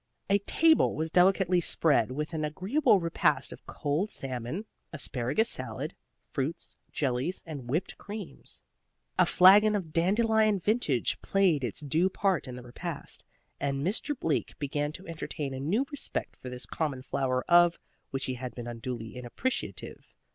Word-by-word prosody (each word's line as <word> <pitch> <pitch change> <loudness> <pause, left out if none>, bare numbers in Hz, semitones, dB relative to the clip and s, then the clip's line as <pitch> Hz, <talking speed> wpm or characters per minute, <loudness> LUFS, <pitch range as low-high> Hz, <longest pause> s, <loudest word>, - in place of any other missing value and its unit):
A 200 - +5
table 320 +10 +3
was 160 +1 -2
delicately 180 0 +4
spread 150 -8 +4
with 150 +5 -4
an 155 -1 -2
agreeable 195 - +2
repast 170 -1 +1
of - - -15
cold 150 +8 -1
salmon, 130 - -3 0.3
asparagus 140 - 0
salad, - - -3 0.4
fruits, 140 +4 -3 0.2
jellies, 135 +5 -1
and 140 -7 -7
whipped 165 +8 -2
creams. 210 -3 -7 0.6
The - - +6
flagon 205 +4 +7
of 170 -6 -4
dandelion 215 +4 +3
vintage 185 - 0
played 185 -8 +2
its 120 +4 -4
due 160 +6 +2
part 190 -5 0
in 125 - -6
the 125 - -9
repast, 145 +6 -5 0.4
and 140 0 -1
Mr. 245 - -1
Bleak 160 - -1
began 145 +1 -2
to 185 +4 -8
entertain 155 -4 -5
a 130 - -5
new 195 - +1
respect 290 - -2
for 130 - -9
this 125 0 -5
common 140 -5 -3
flower 130 -1 -1
of 175 0 +6 0.3
which 135 0 -2
he 130 - -2
had 125 -1 -6
been 120 - -6
unduly 115 -1 -6
inappreciative. 125 - -4
160 Hz, 150 wpm, -29 LUFS, 130-195 Hz, 0.6 s, flagon